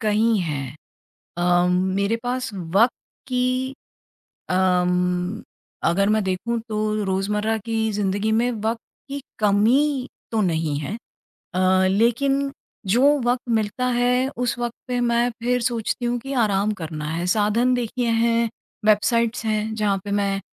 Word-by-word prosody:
कई 220 +1 +2
हैं 140 -4 -4 0.6
अ, 175 0 +3
मेरे 190 +4 +1
पास 250 +1 -2
वक़्त 195 +6 +2 0.4
की 255 +1 0 0.8
अम्म, 180 +1 +1 0.5
अगर 195 +4 +2
मैं 215 0 +2
देखूँ 205 +6 -1
तो 215 - -2 0.3
रोज़मर्रा 210 +3 0
की 225 -1 0
ज़िंदगी 205 +1 0
में 235 +3 +2
वक़्त 225 +1 -2 0.3
की 280 0 -5 0.2
कमी 250 +7 +3 0.2
तो 225 - 0
नहीं 160 -6 0
हैं 155 +9 -4 0.6
अ, 185 +1 +3
लेकिन 270 +7 +2 0.4
जो 285 +4 +4
वक़्त 245 0 -1
मिलता 220 +2 0
है 250 +1 +2
उस 245 -1 -1
वक़्त 240 -1 -2
पे 250 -1 -1
मैं 235 0 +2
फिर 250 0 +1
सोचती 235 0 -1
हूँ 240 0 0
कि 270 +3 -6
आराम 200 +1 +1
करना 155 -1 -5
है 170 +2 -2
साधन 215 +6 +2
देखिए 245 0 -1
हैं, 230 0 +2 0.4
वेबसाइटस 230 +2 +2
हैं, 215 0 -1
जहाँ 210 -2 +1
पे 200 - -4
मैं 200 -1 0
220 Hz, 135 wpm, -23 LUFS, 190-240 Hz, 0.8 s, जो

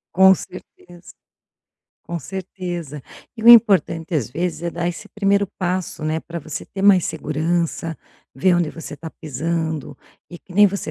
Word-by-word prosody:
Com 190 +1 +7
certeza, 175 0 -12 0.9
com 170 - -4
certeza. 175 -5 -6 0.3
E 225 - -7
o - - +7
importante 195 -7 +6
às 130 -7 -1
vezes 170 +5 -3
é 170 - -2
dar 170 0 -2
esse 175 +5 -6
primeiro 200 -1 +1
passo, 180 -3 -2
né, 155 +1 -1
para 170 +1 -7
você 155 -1 -6
ter 195 - -8
mais 195 -3 +5
segurança, 160 +2 -2 0.4
ver 175 +7 +3
onde 175 -3 +1
você 165 -2 -8
está 160 +2 -9
pisando, 160 +1 -3 0.4
e 175 - -9
que 180 - -16
nem 205 +1 +7
você 200 0 -3
175 Hz, 160 wpm, -21 LUFS, 160-190 Hz, 0.9 s, Com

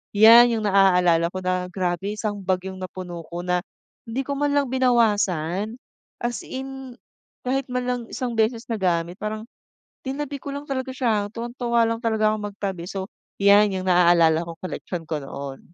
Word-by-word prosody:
'Yan 230 +2 +8
yung 220 - -2
naaalala 180 -4 +4
ko 185 - -4
na 180 0 -1
grabe 180 +2 -2
isang 210 -1 -3
bag 185 -1 +1
yong 190 0 -7
napuno 180 -2 -7
ko 175 +1 -6
na 180 0 +1 0.5
hindi 255 +4 -2
ko 280 +1 -4
man 290 0 +1
lang 280 -3 +1
binawasan 210 -6 +1 0.4
as 240 0 -3
in 265 -1 -7 0.5
kahit 270 +1 -1
man 250 0 -2
lang 250 0 -1
isang 245 -2 -3
beses 225 +1 0
nagamit, 180 -6 -1
parang 215 +1 -4 0.6
tinabi 280 +1 -4
ko 280 +1 -7
lang 285 +1 -6
talaga 260 -1 -3
siya 215 -5 0
tuwang-tuwa 235 0 0
lang 230 0 -1
talaga 220 -1 +2
akong 210 -1 -4
magtabi, 195 -3 -4
so 190 -1 -4 0.3
yan 200 +1 +6
yung 185 0 -3
naaalala 170 -2 +5
ko 170 - -7
koleksyon 180 -2 -6
ko 150 -3 -3
noon. 135 0 -7
210 Hz, 170 wpm, -23 LUFS, 180-245 Hz, 0.6 s, Yan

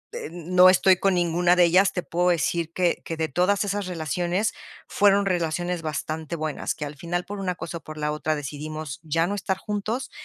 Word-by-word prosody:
eh, - - -5
no 180 +2 +5
estoy 185 0 +5
con 195 0 +2
ninguna 175 0 +3
de 180 - +5
ellas, 185 +3 +4
te 180 - -2
puedo 175 +1 +1
decir 170 0 0
que 180 -2 +1
que 165 - -5
de 160 0 -1
todas 180 +8 +2
esas 205 -1 -2
relaciones 175 +4 -1 0.3
fueron 200 0 +3
relaciones 175 -1 -1
bastante 155 +1 -4
buenas, 155 -2 -3
que 150 - -5
al 145 +1 -7
final, 175 +3 -3
por 205 0 -6
una 185 -2 -2
cosa 170 -1 -6
o - - -28
por 155 0 -9
la 150 0 -1
otra, 155 +1 -1
decidimos 150 +1 -6
ya 165 +1 0
no 195 - -2
estar 190 -2 -2
juntos, 210 +5 -3
175 Hz, 205 wpm, -25 LUFS, 155-185 Hz, 0.3 s, no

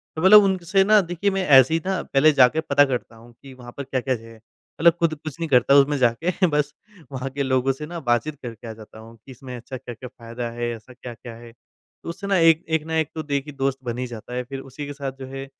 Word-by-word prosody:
तो 160 - -4
मतलब 210 +2 +8
उन 190 -1 +1
से 195 +3 +3
ना 215 +1 +5
देखिए 175 +2 -2
मैं 190 -1 -1
ऐसे 135 +1 +6
ही 165 - +1
ना 190 -1 -1
पहले 150 +3 +3
जाके 135 +2 +4
पता 145 -2 +3
करता 125 -3 -4
हूँ, 120 +1 -17
कि 135 -1 -12
वहाँ 120 -1 -12
पर 140 - -4
क्या-क्या 130 -1 -2
है? 115 0 -12 0.4
मतलब 170 +1 +6
खुद 165 -2 +1
कुछ 155 +2 -9
नहीं 165 -2 -3
करता 125 +1 +4
उसमें 140 +1 +4
जाके 160 +10 +1
बस 150 -2 -1 0.4
वहाँ 130 0 -4
के 140 +1 -3
लोगों 130 0 +1
से 150 +3 -8
ना 170 +2 -7
बातचीत 130 +4 -1
करके 115 -1 -8
आ 110 - -6
जाता 110 0 -14
हूँ 115 +1 -13
कि 135 - -12
इसमें 125 0 -10
अच्छा 125 +2 -8
क्या-क्या 125 0 -10
फायदा 115 -1 -7
है, 120 0 -3
ऐसा 115 +3 -15
क्या-क्या 120 -1 -10
है? 115 0 -13
तो 120 - -16
उससे 200 +4 -6
ना 195 -2 +2
एक 165 -1 +4
एक 160 -1 0
ना 160 0 -3
एक 160 -2 0
तो 160 - -4
देखिए 145 0 -3
दोस्त 135 0 -1
बन 120 -1 -4
ही 125 - -3
जाता 120 +1 -9
है 125 - -2
फिर 135 +2 -7
उसी 135 +2 -8
के 145 - -6
साथ 140 -1 -5
जो 135 - -7
है 135 0 -7
135 Hz, 260 wpm, -22 LUFS, 125-160 Hz, 0.4 s, मतलब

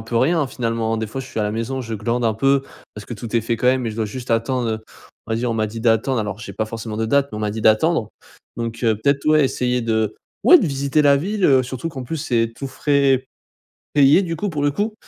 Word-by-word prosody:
peu 115 +1 -4
rien 160 +8 +3
hein 145 - 0
finalement. 115 -2 -2
Des 110 - -2
fois 120 +6 -5
je 130 - -8
suis 130 - -6
à - - +1
la 105 - -1
maison 115 +4 -3
je 115 -2 -7
glande 115 +3 -1
un 110 - +2
peu 135 +5 +2 0.3
parce 105 - -9
que 120 - -8
tout 115 +1 -7
est 115 - +1
fait 115 +1 -1
quand - - 0
même 130 0 +3
mais 115 - -2
je 110 - -9
dois 110 - -1
juste 125 +4 -7
attendre, 115 +1 0
heu, 110 - -2 0.5
on 110 - -3
va 110 - +1
dire, 120 +1 -1
on - - -1
m'a 110 -1 0
dit 115 +2 -7
d'attendre, 115 +3 +2
alors 105 -2 -3
j'ai 120 - -8
pas 110 - -1
forcément 110 0 -6
de 110 - -1
date 140 +4 +2
mais 105 - -6
on - - -4
m'a 105 -1 -1
dit 110 +1 -5
d'attendre. 110 +3 +3 0.5
Donc, 115 0 -4
heu, 110 - +3
peut-être 140 +6 0
ouais 155 -1 +5
essayer 125 -1 0
de 110 -2 0 0.3
ouais 360 - +9
de - - 0
visiter 140 +1 +1
la 140 -1 +5
ville, 200 +6 -2
heu, 135 -4 +5
surtout 130 +5 -5
qu'en 135 -5 -7
plus 160 +7 -4
c'est 115 -5 0
tous 135 - -5
frais 135 -2 +1 0.7
payés 145 +5 +6
du 165 -2 -3
coup 205 +5 -2
pour 150 -4 -3
le 145 0 +2
coup. 210 +8 -2
120 Hz, 280 wpm, -21 LUFS, 110-140 Hz, 0.7 s, ouais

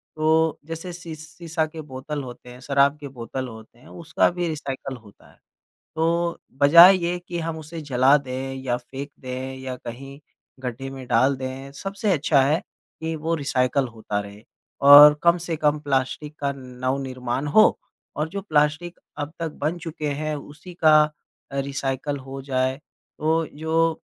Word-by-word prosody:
तो 160 0 +2
जैसे 165 +3 -6
सी 170 -2 -8
सीसा 160 +1 -4
के 155 0 -8
बोतल 140 +1 -6
होते 125 0 -10
हैं, 125 +1 -12
शराब 140 +2 +2
के 145 - -7
बोतल 130 0 -6
होते 110 0 -13
हैं, - - -18
उसका 170 -2 0
भी 175 -1 -2
रिसाइकल 135 -3 -5
होता 105 -3 -19
है। - - -26 0.6
तो 170 +1 0 0.2
बजाय 170 +6 +9
ये 175 +1 -1
कि 175 - -3
हम 165 -1 -3
उसे 160 +1 -8
जला 135 0 +4
दें 135 0 -5
या 120 -2 0
फेंक 135 +3 -8
दें 130 0 -5
या 130 -1 -5
कहीं 135 +4 -9 0.4
गड्ढे 130 +1 -5
में 130 -2 -9
डाल 135 +2 +3
दें, 130 +1 -6
सबसे 195 +1 -1
अच्छा 145 -2 +3
है 150 +5 +2 0.4
कि 160 0 -3
वो 160 +2 -1
रिसाइकल 130 0 +1
होता 110 -3 -4
रहे 100 +1 -10 0.5
और 145 +1 +11
कम 170 +1 +4
से 165 - -1
कम 150 0 +2
प्लास्टिक 145 +2 -2
का 140 -1 0
नवनिर्माण 130 +1 -3
हो 215 - +6 0.4
और 150 +2 -1
जो 200 +4 -5
प्लास्टिक 155 0 0 0.2
अब 150 +1 -4
तक 165 -1 -3
बन 165 +4 0
चुके 160 -2 -5
हैं, 155 +2 -2
उसी 150 +5 -11
का 155 -2 +6 0.5
अ, 140 - -3
रिसाइकल 135 +1 -3
हो 135 0 -8
जाए। 130 -1 0 0.4
तो 160 +1 +1
जो 160 +1 0
145 Hz, 165 wpm, -23 LUFS, 130-160 Hz, 0.6 s, और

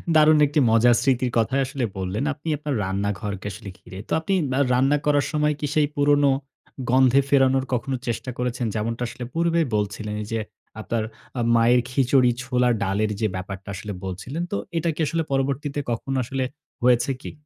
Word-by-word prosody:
দারুণ 155 0 +6
একটি 150 +2 +1
মজার 115 +2 +5
স্মৃতির 130 -2 +1
কথাই 130 +4 +2
আসলে 130 0 -4
বললেন, 95 +5 -2
আপনি 150 +2 -13
আপনার 150 -1 -3
রান্নাঘরকে 100 +1 -3
আসলে 100 +1 -9
ঘিরে। 95 - -11
তো - - -17
আপনি 160 +5 -2 0.2
ম্যা 130 - +1
রান্না 135 +4 +3
করার 145 -1 +3
সময় 150 -1 +1
কি 150 - -2
সেই 150 -1 +4
পুরনো 145 0 +4 0.6
গন্ধে 130 +1 +5
ফেরানোর 135 -1 +3
কখনো 125 +2 -1
চেষ্টা 120 +2 -3
করেছেন? 125 0 -2
যেমনটা 115 +3 -2
আসলে 125 +1 -7
পূর্বে 170 0 +1 0.2
বলছিলেন 105 +1 -2
এই - - -9
যে 115 - 0 0.4
আপনার 115 0 -2 0.4
আ - - +1
মায়ের 120 +2 +5
খিচুড়ি, 130 -1 +3
ছোলার 125 -1 +2
ডালের 100 +2 0
যে 110 - +3
ব্যাপারটা 95 +1 -6
আসলে 105 +2 -6
বলছিলেন। 120 - -4
তো 200 - 0 0.2
এটা 165 +1 0
কি - - -13
আসলে 165 +2 0
পরবর্তীতে 140 +1 -1
কখনো 135 +3 -2
আসলে 130 +2 -2 0.4
হয়েছে 125 +1 +4
কি? - - -7
125 Hz, 175 wpm, -23 LUFS, 110-140 Hz, 0.6 s, দারুণ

